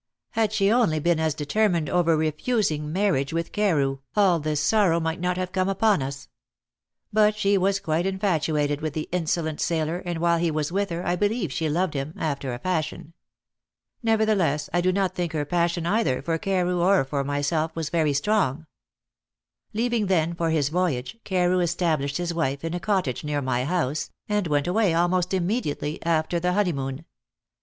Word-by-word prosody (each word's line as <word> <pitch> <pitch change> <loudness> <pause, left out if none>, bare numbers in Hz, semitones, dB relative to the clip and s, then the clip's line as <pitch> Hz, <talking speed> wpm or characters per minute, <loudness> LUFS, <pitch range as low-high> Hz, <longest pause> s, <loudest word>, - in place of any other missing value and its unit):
had 220 -2 +1
she 205 -2 +2
only 225 -10 +3
been 170 +1 +1
as 160 -2 0
determined 170 +2 +1
over 165 0 +2
refusing 155 0 0
marriage 180 -7 +1
with 165 0 -2
Carew, 145 -10 +1 0.2
all 190 -5 +4
this 150 -1 -1
sorrow 185 -1 +3
might 160 +1 -2
not 180 +1 -1
have 185 0 -3
come 185 0 0
upon 195 -2 +2
us. 135 0 -5 0.9
But 210 0 +4
she 200 -1 +2
was 195 +1 +2
quite 165 +2 0
infatuated 155 -6 0
with 155 -2 -3
the 155 0 -3
insolent 165 -3 -1
sailor, 165 +1 0
and 175 -2 -4
while 170 0 +2
he 170 0 +1
was 155 0 -2
with 200 +2 0
her 170 +1 -4
I 175 - +1
believe 205 - -1
she 160 +2 -1
loved 175 +2 0
him 140 +3 -4
after 140 -4 -2
a 120 - -4
fashion. 160 0 -3 0.9
Nevertheless, 215 - +1
I 175 - +2
do 185 +1 +2
not 190 0 0
think 175 -3 -3
her 150 -2 -1
passion 170 +1 0
either 195 - +1
for 165 -1 -1
Carew 180 -1 0
or 190 -2 +4
for 140 +1 -2
myself 145 +3 -1
was 160 -2 -3
very 155 -4 +2
strong. 160 -2 0 1.1
Leaving 230 -1 0
then 170 -3 +1
for 170 -1 -1
his 150 -3 +1
voyage, 175 - -1
Carew 180 -1 +1
established 165 -5 0
his 175 -1 -2
wife 140 -4 -1
in 165 0 -3
a 175 - -2
cottage 185 - -1
near 150 -1 -1
my 130 -2 -1
house, 155 -3 -1 0.2
and 210 -3 0
went 145 -2 +1
away 185 -1 +2
almost 175 +1 +1
immediately 175 -6 -1
after 165 +1 0
the 180 +1 0
honeymoon. 155 -7 -1
170 Hz, 180 wpm, -25 LUFS, 150-190 Hz, 1.1 s, all